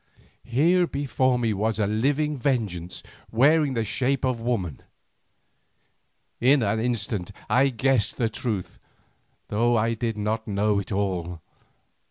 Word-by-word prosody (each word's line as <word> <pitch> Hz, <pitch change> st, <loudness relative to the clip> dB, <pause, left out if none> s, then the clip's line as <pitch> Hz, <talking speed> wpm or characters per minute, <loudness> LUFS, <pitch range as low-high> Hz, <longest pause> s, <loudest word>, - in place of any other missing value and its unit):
Here 170 Hz, +8 st, +3 dB
before 130 Hz, -3 st, 0 dB
me 115 Hz, -3 st, 0 dB
was 110 Hz, +2 st, -1 dB
a 105 Hz, -, +1 dB
living 140 Hz, +8 st, 0 dB
Vengeance 110 Hz, -10 st, -2 dB, 0.3 s
wearing 140 Hz, +3 st, +3 dB
the 115 Hz, -1 st, 0 dB
shape 135 Hz, +3 st, 0 dB
of 125 Hz, -3 st, -1 dB
woman. 105 Hz, -, -2 dB, 1.6 s
In 130 Hz, +1 st, +4 dB
an 110 Hz, +1 st, 0 dB
instant 110 Hz, -5 st, -2 dB, 0.2 s
I 135 Hz, +2 st, +3 dB
guessed 130 Hz, -3 st, +1 dB
the 115 Hz, -, +1 dB
truth, 110 Hz, -4 st, -4 dB, 0.7 s
though 120 Hz, +3 st, +2 dB
I 115 Hz, +1 st, +1 dB
did 115 Hz, -1 st, -3 dB
not 110 Hz, +2 st, -2 dB
know 105 Hz, 0 st, +1 dB
it 100 Hz, -, -7 dB
all. 90 Hz, -4 st, -2 dB
115 Hz, 130 wpm, -25 LUFS, 105-130 Hz, 1.6 s, In